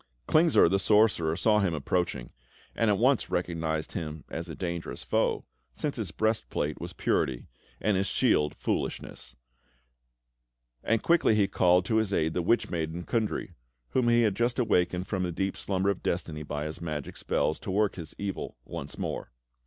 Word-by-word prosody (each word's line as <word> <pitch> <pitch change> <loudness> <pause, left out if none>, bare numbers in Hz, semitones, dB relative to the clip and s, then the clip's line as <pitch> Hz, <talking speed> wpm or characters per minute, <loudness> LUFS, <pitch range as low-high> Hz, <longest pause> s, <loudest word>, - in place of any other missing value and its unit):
Klingsor, 160 - +5
the 100 +3 +2
sorcerer, 100 -6 +3
saw 105 +4 +3
him 95 -5 +1
approaching, 75 -4 -1 0.4
and 115 - +2
at 100 - +3
once 130 +3 +3
recognised 80 -3 -1
him 80 -4 -5
as 85 +1 -4
a 80 - -6
dangerous 85 -2 -4
foe, - - 0 0.3
since 150 - -2
his 110 -6 -3
breastplate 105 -6 -1
was - - -5
purity, 60 -2 -1 0.3
and 105 -1 +1
his 95 +1 +1
shield 75 -4 +2
foolishness; - - -4 1.5
and 115 -1 +1
quickly 170 -9 +4
he 100 -2 +3
called 90 -1 +3
to 110 +2 +1
his 110 -2 +1
aid 80 -4 +1
the 90 - 0
witch 115 +8 +1
maiden, 85 0 -3
Kundry, 110 +2 -1 0.4
whom 125 -2 +1
he 120 0 +5
had 105 -3 +3
just 120 +4 0
awakened 90 -6 +1
from 95 -2 -2
the 90 -1 -1
deep 95 +3 -2
slumber 95 0 0
of 100 - -5
destiny 80 -3 -2
by 75 0 -4
his 75 +1 -6
magic 75 -4 -4
spells, 80 - 0
to - - -7
work 100 +2 +2
his 80 -4 -8
evil 100 -10 -4
will - - -14
once - - -6
more. - - -4
95 Hz, 175 wpm, -28 LUFS, 80-110 Hz, 1.5 s, Klingsor